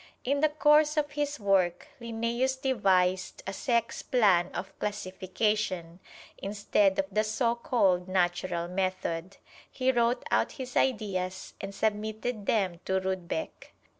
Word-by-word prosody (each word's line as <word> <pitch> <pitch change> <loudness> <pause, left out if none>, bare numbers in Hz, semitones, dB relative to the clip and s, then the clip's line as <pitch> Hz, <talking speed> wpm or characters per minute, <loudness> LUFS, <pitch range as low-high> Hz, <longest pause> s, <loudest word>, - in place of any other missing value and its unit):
In 280 +3 +1
the 310 +1 +4
course 300 0 +4
of 295 -1 +1
his 295 -1 -2
work, 190 -4 +1
Linnæus 235 +3 -1
devised 190 -8 +1
a 195 - -4
sex 235 +2 0
plan 195 -8 +3
of 190 +1 -6
classification, 190 -2 -2 0.4
instead 200 -1 +1
of 195 - +1
the 215 +2 +2
so 230 +2 +1
called 195 -7 +1
natural 175 -1 0
method. 185 -1 -2 0.3
He 260 0 +1
wrote 240 0 +1
out - - +2
his 255 -1 -7
ideas 190 -7 -1
and 195 - -5
submitted 215 +1 -2
them 190 -6 +1
to 190 0 +1
Rudbeck. 190 - -4
205 Hz, 130 wpm, -29 LUFS, 185-240 Hz, 0.4 s, the